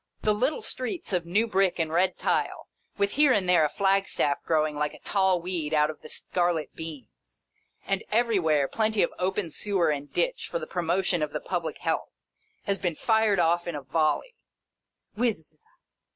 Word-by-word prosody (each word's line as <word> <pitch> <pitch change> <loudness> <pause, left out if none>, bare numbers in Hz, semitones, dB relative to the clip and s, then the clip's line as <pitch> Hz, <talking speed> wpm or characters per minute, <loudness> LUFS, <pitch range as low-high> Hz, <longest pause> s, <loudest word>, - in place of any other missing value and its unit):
Whirr! - - -22
The 215 - +4
little 255 +8 0
streets 255 - -4
of 175 -2 0
new 205 +6 +2
brick 195 -4 +1
and 160 -2 -1
red 180 +2 +2
tile, - - -1 0.3
with 200 0 +1
here 290 -1 +4
and 200 -6 +2
there 180 -3 +5
a 150 - +2
flagstaff 195 -5 +1
growing 155 -2 +1
like 150 0 -2
a - - -14
tall 190 -2 +2
weed 170 -3 -2
out 150 0 +3
of 155 - -16
the 155 - -11
scarlet 175 -3 -1
beans, 135 - -10 0.4
and, 195 -1 -1
everywhere, 190 - +2
plenty 220 +2 +1
of - - -1
open 185 -1 -1
sewer 185 -3 +1
and 145 -1 -4
ditch - - 0
for - - -1
the - - -5
pro 180 - -3
motion 175 0 +1
of 150 -1 -2
the - - -2
public 175 -3 -3
health, - - -2 0.5
have 200 -2 -1
been 175 -3 -1
fired 220 +1 +2
off 175 0 +2
in 170 - -3
a 145 - -6
volley. 155 - 0 0.8
Whizz 210 -9 -2
180 Hz, 185 wpm, -27 LUFS, 155-205 Hz, 0.8 s, there